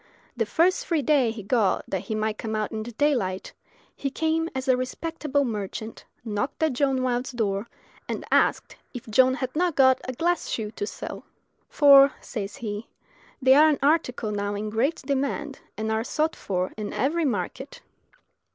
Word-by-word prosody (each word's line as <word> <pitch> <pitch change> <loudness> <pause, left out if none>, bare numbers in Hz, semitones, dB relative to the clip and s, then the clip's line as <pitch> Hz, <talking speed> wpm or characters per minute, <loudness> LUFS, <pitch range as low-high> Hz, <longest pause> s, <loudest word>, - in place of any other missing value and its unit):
The 225 -3 -1
first 345 - +2
free 320 -4 +1
day 270 -3 +3
he 220 -2 -6
got 210 -1 +1
that 190 0 -3
he 220 - -3
might 215 0 -2
come 220 -1 -3
out 215 -1 -2
in 220 - -3
the 235 +2 -6
daylight, 225 -9 0 0.4
he 275 - -3
came 320 +3 0
as 260 +1 -3
a 260 - +5
respectable 285 +2 -2
merchant, 220 0 -5 0.2
knocked 220 +8 -2
at 315 -4 +2
John 265 0 +1
Wilde's 250 0 -1
door, 210 -3 -2 0.4
and - - -4
asked - - +2 0.2
if 245 +1 -7
John 260 +4 +4
had 260 -1 -4
not 345 -1 +1
got 260 -1 +5
a 255 - -3
glass 345 +7 0
shoe 215 -2 -3
to 410 - -4
sell: - - -7 0.5
"For," 280 -2 +7
says 205 -4 -6
he, 210 -1 -5 0.6
"they 260 0 +7
are 305 +3 +7
an 295 - +2
article 275 -7 +1
now 205 0 -2
in 210 +1 -4
great 260 +9 0
demand, 280 +1 -2 0.2
and 220 +1 -2
are 220 0 0
sought 310 +6 -1
for 185 -1 -3
in 210 -1 -5
every 325 +5 0
market." 245 +3 -3
255 Hz, 180 wpm, -25 LUFS, 215-285 Hz, 0.6 s, For